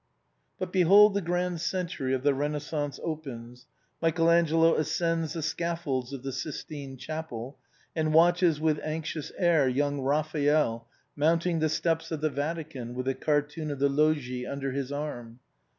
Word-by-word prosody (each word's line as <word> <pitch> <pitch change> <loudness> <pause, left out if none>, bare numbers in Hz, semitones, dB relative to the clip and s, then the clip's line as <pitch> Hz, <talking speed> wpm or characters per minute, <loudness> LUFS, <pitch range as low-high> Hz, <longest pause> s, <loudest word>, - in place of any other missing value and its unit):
But 185 -1 -4
behold 195 +3 +7
the 200 - 0
grand 175 -1 -1
century 170 -9 -2
of 130 - -4
the 145 -1 +4
Renaissance 145 +1 -3
opens, 125 -6 -6 0.3
Michael 165 0 +3
Angelo 165 -1 +4
ascends 165 +1 0
the 165 -2 -4
scaffolds 155 -6 -2
of 135 -2 -7
the 135 - -3
Sixtine 140 0 -6
Chapel 140 -4 -6 0.4
and 155 -1 +1
watches 170 0 +4
with 155 -1 +1
anxious 155 -1 -4
air 170 -6 +3
young 145 +2 0
Raphael 145 -4 +1 0.3
mounting 165 +3 +2
the 155 0 +2
steps 160 +1 0
of 160 - -2
the 155 -1 +1
Vatican 145 -5 -4
with 125 0 -3
the 135 - +1
cartoon 150 +2 -1
of 145 - -3
the 140 +1 +2
Loggie 140 -4 +1
under 140 -1 -3
his 135 0 -3
arm. 125 -5 -5
150 Hz, 150 wpm, -28 LUFS, 140-165 Hz, 0.4 s, behold